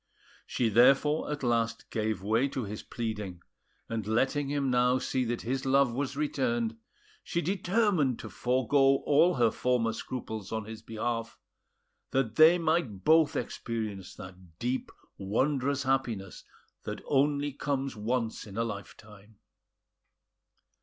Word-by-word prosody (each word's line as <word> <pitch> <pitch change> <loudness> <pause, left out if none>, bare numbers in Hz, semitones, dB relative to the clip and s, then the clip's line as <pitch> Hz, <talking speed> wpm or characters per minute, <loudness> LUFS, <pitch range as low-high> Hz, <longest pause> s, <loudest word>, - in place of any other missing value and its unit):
She 120 -3 0
therefore 135 +7 +4
at 145 -2 -4
last 115 -2 0
gave 110 -3 -2
way 110 +6 +2
to 135 -2 -4
his 105 0 -6
pleading; 105 -6 -5 0.4
and 110 -3 -4
letting 135 +5 +1
him 140 -2 0
now 125 +1 +3
see 130 0 -1
that 120 0 -3
his 130 +3 -2
love 135 -2 +3
was 140 +2 -3
returned, 235 - 0 0.5
she 170 - -2
determined 185 - +1
to - - -8
forego 135 +2 +2
all 165 +5 +4
her 120 -3 +3
former 120 -2 0
scruples 110 -4 -6
on 110 -1 -3
his 110 0 -8
behalf, 115 +1 -3 0.7
that 130 -4 0
they 160 +3 +7
might 160 - 0
both 160 +1 +4
experience 105 -5 -4
that 90 -3 -12
deep 125 +4 -2 0.3
wondrous 135 +7 0
happiness 120 -8 -2 0.4
that - - -6
only 145 0 +1
comes 135 -2 -2
once 115 +1 -2
in 100 +1 -9
a 115 - +1
life 100 -4 -6
time. 105 0 -16
125 Hz, 135 wpm, -29 LUFS, 110-140 Hz, 0.7 s, they